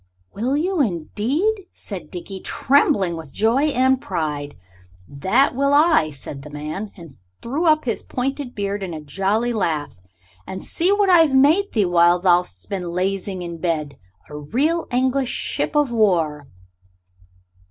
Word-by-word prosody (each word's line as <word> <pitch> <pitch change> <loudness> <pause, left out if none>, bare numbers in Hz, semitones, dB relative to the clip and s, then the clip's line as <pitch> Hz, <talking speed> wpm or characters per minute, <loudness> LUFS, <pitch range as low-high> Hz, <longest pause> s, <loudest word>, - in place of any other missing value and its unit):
"Will 255 +6 -1
you, 355 +1 0
indeed?" 275 - -1
said 180 -7 -8
Dickie, 190 +2 -7
trembling 230 - +2
with 160 -4 -9
joy 230 +7 +2
and 260 -2 +2
pride. 150 - -3 0.5
"That 190 - +1
will 280 +2 +2
I," 300 - +4
said 140 -1 -8
the 150 - -11
man, 155 +8 -6
and 165 -7 -13 0.3
threw 285 +9 -2
up 310 -2 +3
his 230 - -2
pointed 265 0 -4
beard 200 0 -3
in 180 -4 -5
a - - -5
jolly 195 +10 -1
laugh. 155 - -2 0.5
"And 190 - -6
see 355 +4 0
what 405 -1 +3
I've 325 -6 +5
made 315 +10 +4
thee 210 -4 +2
while 175 0 +4
thou'st 180 -1 +1
been 185 -4 -4
lazying 185 +1 -2
in 170 -1 -7
bed 155 -5 -2 0.3
a 150 - -10
real 290 - 0
English 260 +1 +1
ship - - -2
of 295 -4 +2
war." 165 -10 +1
205 Hz, 150 wpm, -21 LUFS, 170-275 Hz, 0.5 s, I've